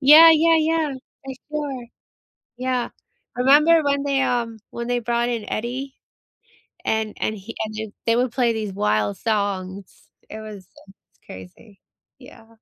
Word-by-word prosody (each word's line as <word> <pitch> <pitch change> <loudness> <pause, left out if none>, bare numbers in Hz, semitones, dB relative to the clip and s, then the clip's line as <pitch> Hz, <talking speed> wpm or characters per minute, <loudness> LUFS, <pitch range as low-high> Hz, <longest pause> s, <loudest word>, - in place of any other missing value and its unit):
Yeah, 305 +4 +9
yeah, 325 +1 +4
yeah. 315 -1 +1 0.3
For 265 -1 -6 0.2
sure. 285 -5 -4 0.7
Yeah. 255 -1 -1 0.5
I - - -4
remember 305 +5 +6
when 280 -1 +1
they, 275 -1 +1
um 235 -3 -1
when 235 0 -5
they 245 0 0
brought 235 +1 0
in 230 -3 -3
Eddie, 260 +4 -4 0.9
and 220 -1 -1
and 215 - -1
he 210 +3 -10
and 215 0 -7
j 220 -1 -6
they 230 0 +3
would 245 0 +1
play 245 -2 +2
these 215 -3 -4
wild 105 - 0
songs, 200 -3 -3 0.2
it 220 - -8
was 215 -1 -8
it - - -20
was 195 - -17 0.3
crazy. 185 - -13 0.4
Yeah. 225 - -15
235 Hz, 155 wpm, -22 LUFS, 215-275 Hz, 0.9 s, Yeah